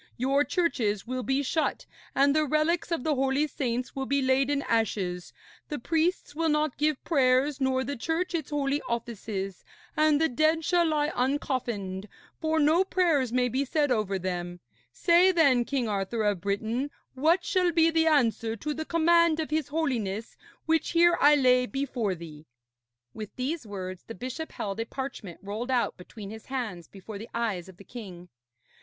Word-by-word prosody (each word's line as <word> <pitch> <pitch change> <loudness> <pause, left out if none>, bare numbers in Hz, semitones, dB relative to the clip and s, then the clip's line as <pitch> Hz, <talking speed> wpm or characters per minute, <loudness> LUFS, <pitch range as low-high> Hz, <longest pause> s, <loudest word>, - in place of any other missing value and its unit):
Your 275 +4 +2
churches 230 - 0
will 255 +1 -3
be 270 +3 0
shut, 310 +4 -1 0.3
and 280 +1 +4
the 310 -1 +2
relics 310 +4 +1
of 330 -7 -1
the 310 - +1
holy 270 +2 +1
saints 250 -4 -3
will 270 -1 -3
be 280 0 +2
laid 265 +1 +2
in 285 -1 0
ashes, 195 -6 -1 0.4
the 300 - -3
priests 325 +3 0
will 325 +1 0
not 300 -2 0
give 300 -2 +1
prayers 270 -1 +2
nor 260 0 +1
the 285 +1 -4
Church 325 +9 -2
its 330 -2 -2
holy 290 -1 0
offices; 215 -5 -4 0.3
and 305 -1 +4
the 320 - +3
dead 310 +4 +1
shall 345 -2 +3
lie 300 -1 +1
uncoffined, 240 -7 -2 0.3
for 320 0 +1
no 315 +5 +4
prayers 330 -10 +1
may 250 0 +2
be 260 +3 0
said 290 0 0
over 210 -5 0
them. 175 -1 -4 0.3
Say, 345 - +4
then, 275 -9 +4
King 260 -3 -1
Arthur 210 +2 -1
of 205 -4 0
Britain, 220 +7 -1 0.2
what 325 +7 +2
shall 360 -2 +2
be 330 0 +4
the 325 0 +2
answer 230 -6 +2
to 300 +7 -3
the 315 +1 -5
command 335 0 +3
of 310 -1 -3
his 310 -2 0
Holiness 235 -9 -2 0.3
which 325 +1 +1
here 345 0 +5
I 295 +1 +7
lay 250 -2 +4
before 250 -8 -2
thee.' 160 -2 -11 0.7
With 215 -2 -8
these 265 0 -3
words 185 -2 -6
the 225 - -7
bishop 260 +6 -6
held 200 +1 -4
a 225 - -1
parchment 260 -10 -6
rolled 215 +5 -4
out 250 -2 +1
between 200 +2 -10
his 220 0 -10
hands 220 -11 -4
before 200 +1 -9
the 225 - -9
eyes 205 -7 -2
of 185 - -14
the 200 - -13
king. 185 -7 -10
265 Hz, 175 wpm, -28 LUFS, 220-310 Hz, 0.7 s, I